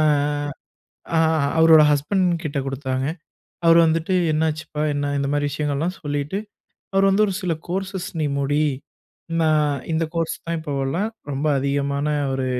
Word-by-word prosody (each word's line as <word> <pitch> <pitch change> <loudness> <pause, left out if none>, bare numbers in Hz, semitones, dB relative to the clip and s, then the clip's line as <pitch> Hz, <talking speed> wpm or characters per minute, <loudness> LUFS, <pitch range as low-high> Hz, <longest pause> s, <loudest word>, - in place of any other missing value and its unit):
ஆ - - +4 1.6
அவரோட 160 -1 +8
ஹஸ்பண்ட் 180 +7 +1 0.2
கிட்டே 145 -3 -2
கொடுத்தாங்க 130 -1 -2 0.6
அவர் 165 0 +7
வந்துட்டு 165 +3 0 0.2
என்னாச்சுப்பா 155 -1 -1
என்ன 145 0 -1
இந்த 140 0 -1
மாதிரி 145 0 +1
விஷயங்கள்லாம் 150 +4 -2
சொல்லிட்டு, 145 +4 -2 0.6
அவர் 195 0 +4
வந்து 195 +2 +4
ஒரு 195 - -2
சில 180 - 0 0.2
கோர்ஸஸ் 190 +1 -3
நீ 150 - +1
முடி 145 +2 +1 0.8
நான் 150 -4 +2
இந்த 160 +1 +1
கோர்ஸ் 165 -1 -1
தான் 170 0 -1
இப்போலாம் 150 +6 -2 0.2
ரொம்ப 140 +3 -2
அதிகமான 140 +1 -1 0.3
ஒரு 130 -1 -1
150 Hz, 135 wpm, -22 LUFS, 140-165 Hz, 1.6 s, அவரோட